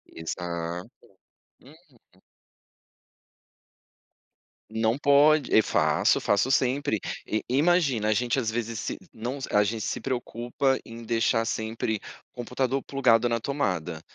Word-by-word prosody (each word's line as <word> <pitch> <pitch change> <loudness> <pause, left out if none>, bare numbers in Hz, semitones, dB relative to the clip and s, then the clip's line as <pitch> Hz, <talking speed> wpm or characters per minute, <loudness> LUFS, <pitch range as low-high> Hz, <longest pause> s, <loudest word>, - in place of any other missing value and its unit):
Exato. 85 +1 -5 0.7
Uhum. 135 - -22 2.5
Não 110 +2 0
pode 145 +2 +4
e 110 - +8
faço, - - +2
faço 105 +6 +1
sempre. 130 -4 +1 0.3
E, 110 - -1
imagina, 140 -6 +2
a - - +4
gente 120 +4 0
às 115 -4 0
vezes 115 -1 -3
se - - -4 0.2
não, 125 +5 -5
a 105 0 +4
gente 110 +2 -2
se - - -3
preocupa 125 +1 -1
em 115 +1 -10
deixar 115 0 +1
sempre 110 -1 -2 0.3
o - - -41
computador 130 +2 -2
plugado 120 -3 +3
na 115 - 0
tomada, 90 - -2
115 Hz, 120 wpm, -26 LUFS, 110-135 Hz, 2.5 s, e